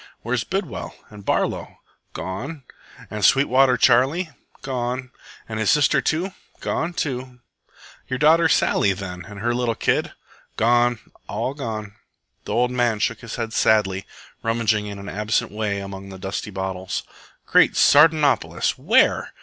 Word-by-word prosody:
"Where's 120 0 -1
Bidwell 190 - -4 0.2
and 105 -1 -11
Barlow?" - - -1 0.4
"Gone." 110 - -6 0.5
"And 105 -1 -4
Sweetwater 135 +1 +4
Charley?" 135 +9 +3 0.3
"Gone." 125 -1 -3 0.4
"And 110 -1 -4
his 110 - +1
sister?" 145 -2 +4 0.6
"Gone 170 +2 -2
too." 130 -4 -4 0.7
"Your 130 - -2
daughter 160 +3 +5
Sally, 100 - +3
then, 90 -2 -7
and 100 0 -10
her 120 +2 +1
little 120 -2 0
kid?" - - 0 0.4
"Gone, 120 +1 +3 0.3
all 115 +6 -2
gone." 110 -7 -6 0.5
The - - -5
old 125 +1 +2
man 120 -3 +1
shook 115 +2 -1
his 115 -3 -7
head 115 -1 -4
sadly, 100 -3 +2 0.3
rummaging 115 -2 0
in 100 -1 -6
an 100 0 -9
absent 105 +2 -1
way 105 -1 -2
among 100 0 -8
the 95 - -9
dusty 95 +2 -4
bottles. 95 -1 -4 0.4
"Great - - +4
Sardanapolis! 145 -3 +4
Where?" - - +3
115 Hz, 135 wpm, -22 LUFS, 105-130 Hz, 0.7 s, daughter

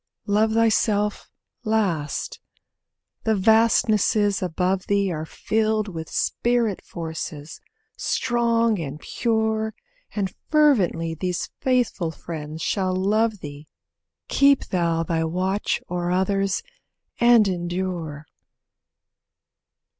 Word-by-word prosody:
Love 215 +1 +2
thyself 215 -2 +1 0.3
last. 200 -10 -1 0.8
The 220 -1 +2
vastnesses 215 -1 +3
above 185 +1 -1
thee 200 -2 +1
Are 155 -1 -4
filled 215 +2 0
with 160 -3 -6
Spirit 235 -4 0
Forces; 160 -2 -6 0.4
strong 230 -3 +1
and 150 -2 -5
pure 220 0 -1 0.4
And 195 -3 -1 0.2
fervently 205 - +3
these 180 +2 -3
faithful 245 -9 +1
friends 160 -1 -7
shall 185 -2 0
love 210 +2 +1
thee 145 +1 -9 0.6
Keep 280 -1 +4
thou 170 -2 +1
thy 165 -1 -1
watch 185 +5 -1
o'er 175 0 -2
others 195 - 0 0.6
and 235 -3 +6
endure. 175 -4 -3
195 Hz, 95 wpm, -23 LUFS, 170-220 Hz, 0.8 s, and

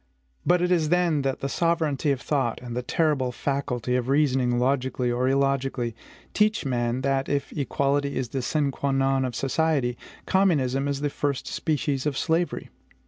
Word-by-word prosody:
But 175 0 +4
it 180 - +1
is 160 -4 +2
then 175 -4 +2
that 135 -1 -2
the 135 - -1
sovereignty 160 -2 0
of 135 -2 -1
thought, 135 -6 -1
and 120 -1 -7
the 125 - -1
terrible 140 -1 +1
faculty 125 -2 -2
of 125 -1 0
reasoning 135 -4 +2
logically 130 -1 0
or 125 +2 +1
illogically, 135 -3 0 0.4
teach 210 -4 +2
man 120 -1 0
that, 135 0 0
if 140 -1 -1
equality 140 0 0
is 125 -3 -2
the 135 - -2
sine 140 +2 0
qua 140 +1 -2
non 135 0 +2
of 125 -3 -3
society, 135 -2 0 0.3
communism 140 -8 +2
is 140 -1 -2
the 145 -1 -1
first 140 -1 -2
species 145 -3 -1
of 140 -2 -1
slavery. 170 +1 -1
135 Hz, 170 wpm, -25 LUFS, 130-150 Hz, 0.4 s, But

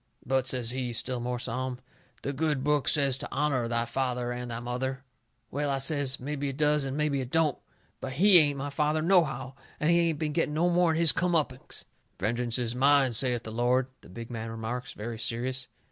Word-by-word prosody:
"But," 130 0 +1
says 125 -3 0
he, 125 -2 -3
still 125 +2 -1
more 125 +1 -2
solemn, 125 +2 -3 0.5
"the 140 - -2
good 150 -2 0
book 150 -1 +1
says 140 -3 +3
to - - -6
honour 135 -4 0
thy 115 0 0
father 125 0 -2
and 125 0 -5
thy 115 0 -4
mother." 130 +2 -3 0.5
"Well," 145 +1 -1
I 135 - +1
says, 140 0 +1
"mebby 145 +1 -3
it 135 - -6
does 150 -1 +3
and 135 +1 -3
mebby 150 -3 +1
it 125 - -6
don't. 160 -2 +1 0.4
But 130 - -5
HE 185 +5 +7
ain't 145 -3 +2
my 140 +1 -4
father, 150 +1 +1
nohow. 155 -7 +2 0.3
And 155 +2 +2
he 170 - +4
ain't 160 - -2
been 150 0 -2
getting 155 -2 0
no 175 +3 +2
more'n 175 -2 +3
his 165 -1 +5
come 175 +3 0
uppings." 135 -5 -2 0.3
"Vengeance 120 +4 -1
is 120 -2 -1
mine, 135 0 +4
saith 120 0 0
the 110 - -7
Lord," 125 +3 +1
the - - -16
big 115 +6 -8
man 115 -1 -5
remarks, 115 +3 -5
very 115 +1 -6
serious. 125 +3 -2
130 Hz, 205 wpm, -28 LUFS, 120-150 Hz, 0.5 s, HE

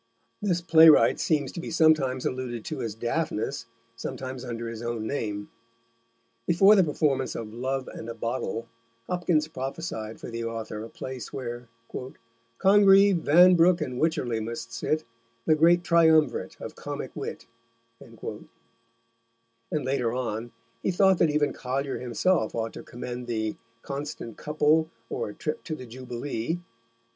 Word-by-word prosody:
This 180 -4 +1
playwright 160 -2 +7
seems 145 -5 +1
to - - -7
be - - -5
sometimes 155 -6 +3
alluded 125 -3 -3
to - - -4
as 110 -3 -3
Daphnis, 120 +1 -2 0.3
sometimes 130 +2 -6
under 120 -2 -5
his 115 -1 -6
own 120 -2 -3
name. 105 -5 -3 1.0
Before 195 +5 +6
the 190 - +6
performance 145 -5 0
of 110 -2 -6
Love 130 +2 -2
and 115 - -8
a 115 - -5
Bottle, 115 0 -3 0.4
Hopkins 170 -2 +1
prophesied 130 -6 -5
for - - -8
the 115 0 -4
author 115 -2 -4
a 115 - -8
place 130 +1 -7
where 120 -2 -6 0.9
Congreve, 195 -1 +6
Vanbrook, 175 +2 +6
and 130 -5 -3
Wicherley 130 -8 0
must 115 +1 -5
sit, 155 +7 -1 0.4
The 155 - +5
great 170 +3 +5
Triumvirate 160 -3 +3
of - - -7
Comick - - -6
Wit, - - -6 0.5
and - - -9 1.4
later 130 -3 0
on 120 -2 -3 0.3
he - - 0
thought 190 0 +4
that 165 - +4
even 150 -1 +1
Collier 135 +2 -3
himself 125 +2 +1
ought 115 -1 -2
to - - -8
commend 120 0 -7
the 110 -2 -2 0.3
Constant 140 -5 -5
Couple, 155 +1 +2 0.2
or - - -2
A 105 - -10
Trip 155 - -4
to 155 - -3
the 130 - -9
Jubilee. 125 +4 -4
130 Hz, 140 wpm, -27 LUFS, 115-160 Hz, 1.4 s, playwright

